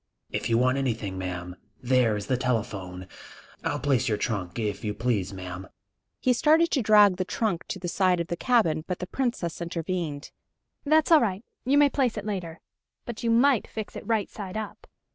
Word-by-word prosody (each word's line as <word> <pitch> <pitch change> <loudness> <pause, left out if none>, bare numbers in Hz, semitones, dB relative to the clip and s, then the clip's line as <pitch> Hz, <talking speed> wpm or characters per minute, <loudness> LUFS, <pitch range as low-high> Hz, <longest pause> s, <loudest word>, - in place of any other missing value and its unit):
"If - - -2
you 115 - +3
want 130 +2 +2
anything, 110 -8 -2
ma'am 90 -1 -5 0.2
there 125 -4 +2
is 100 - -5
the 130 - +1
telephone.... 100 -7 -3 0.6
I'll - - -1
place 135 -5 +1
your 105 - +1
trunk, 100 -5 -3
if 105 -3 -2
you 105 -1 -2
please, 110 -5 0
ma'am!" 90 -1 -7 0.5
He 255 - +3
started 315 +6 +4
to 270 - +2
drag 210 -3 +6
the 185 - 0
trunk 190 -2 -2
to - - -4
the 180 -1 -5
side 185 0 +2
of 170 - -1
the 170 - -3
cabin, 170 -9 +2
but 180 - -2
the 180 - -5
Princess 190 -7 -2
intervened. 170 -3 -3 0.5
"That's 310 +2 +3
all 320 -3 +8
right; 200 -1 -1 0.2
you 275 +3 +3
may 290 -1 +5
place 255 -5 +1
it 210 - -4
later. 180 -6 -4 0.4
But 235 -2 -6
you 235 - 0
might 245 +1 +4
fix 220 -2 -6
it - - -8
right 225 -3 +1
side 200 -1 -7
up!" 215 -1 -7
170 Hz, 195 wpm, -26 LUFS, -, 0.6 s, all